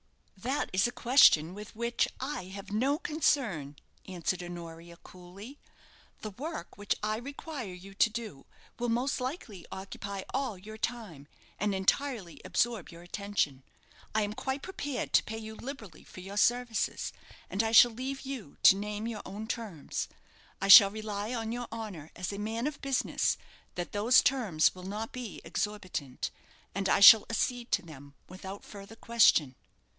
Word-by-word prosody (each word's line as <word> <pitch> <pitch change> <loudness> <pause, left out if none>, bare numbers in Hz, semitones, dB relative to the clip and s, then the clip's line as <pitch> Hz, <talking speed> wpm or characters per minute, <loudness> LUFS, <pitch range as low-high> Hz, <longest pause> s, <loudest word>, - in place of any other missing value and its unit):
"That 255 +9 -2
is 190 +4 +3
a - - -4
question 235 - +5
with 210 +2 -10
which 235 +1 0
I 265 -8 -4
have 195 +2 -9
no 260 +7 +1
concern," 245 - 0 0.3
answered 180 0 -2
Honoria, 170 -1 -9
coolly. 190 +12 -12 0.6
"The 215 - -5
work 305 - -6
which 205 - 0
I 215 0 0
require 275 - -7
you 195 +2 -12
to 200 - +4
do 215 -10 -7 0.3
will 240 0 -1
most 250 +3 0
likely 250 - -6
occupy 195 0 -6
all 260 -6 -1
your 215 +4 -11
time, 205 - -4 0.3
and 205 -1 0
entirely 195 - -1
absorb 230 -5 0
your 170 0 -12
attention. 175 -7 -2 0.5
I 220 - +3
am 205 0 -3
quite 265 +5 -3
prepared 290 -8 -4
to - - +6
pay 220 - -6
you 220 0 -7
liberally 220 - -9
for 185 - -12
your 195 +2 -8
services, 240 0 +1 0.3
and 195 - 0
I 225 0 0
shall 235 +1 +8
leave 265 +4 -5
you 265 - -7
to - - +9
name 210 +2 -4
your 230 -2 -4
own 205 +3 -7
terms. 215 -9 -4 0.5
I 195 - -2
shall 200 0 +12
rely 215 +2 -4
on 225 -1 -3
your 240 0 -4
honour 205 -9 -7
as 180 +3 -4
a 200 - -5
man 225 +3 -2
of 295 -1 -4
business 275 -2 0 0.4
that 175 -1 -4
those 220 +5 +5
terms 220 -12 +2
will 185 - -11
not 215 +3 -4
be 245 -5 -7
exorbitant, 185 -11 -3 0.4
and 195 0 -1
I - - +3
shall 220 +1 +10
accede 240 +1 -1
to 205 - +2
them 145 -3 -13
without 190 +2 -9
further 200 +2 -11
question." 220 - +4
210 Hz, 160 wpm, -30 LUFS, 190-240 Hz, 0.6 s, shall